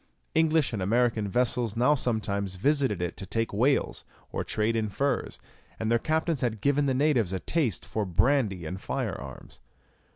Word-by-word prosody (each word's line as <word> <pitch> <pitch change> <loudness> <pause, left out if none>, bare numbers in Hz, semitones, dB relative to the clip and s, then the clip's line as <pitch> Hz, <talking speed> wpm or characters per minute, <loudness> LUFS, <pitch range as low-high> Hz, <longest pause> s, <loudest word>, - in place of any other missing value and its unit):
English 160 -4 +2
and 105 - -2
American 115 +1 +1
vessels 120 0 +1
now 125 +5 +4
sometimes 100 -7 -1
visited 130 - +1
it 90 - -3
to 100 - -7
take 115 +4 -1
whales, 130 +7 +1 0.3
or - - -2
trade 110 +2 0
in 110 -2 0
furs, 140 +7 -1 0.4
and 110 0 -1
their 115 - +4
captains 160 +1 0
had 115 -3 -1
given 140 +5 +2
the 130 - +1
natives 130 - +2
a 95 - -1
taste 140 - -1
for 110 - -2
brandy 100 - +1
and 90 +4 -5
fire - - -2
arms. - - -10
115 Hz, 170 wpm, -27 LUFS, 100-140 Hz, 0.4 s, now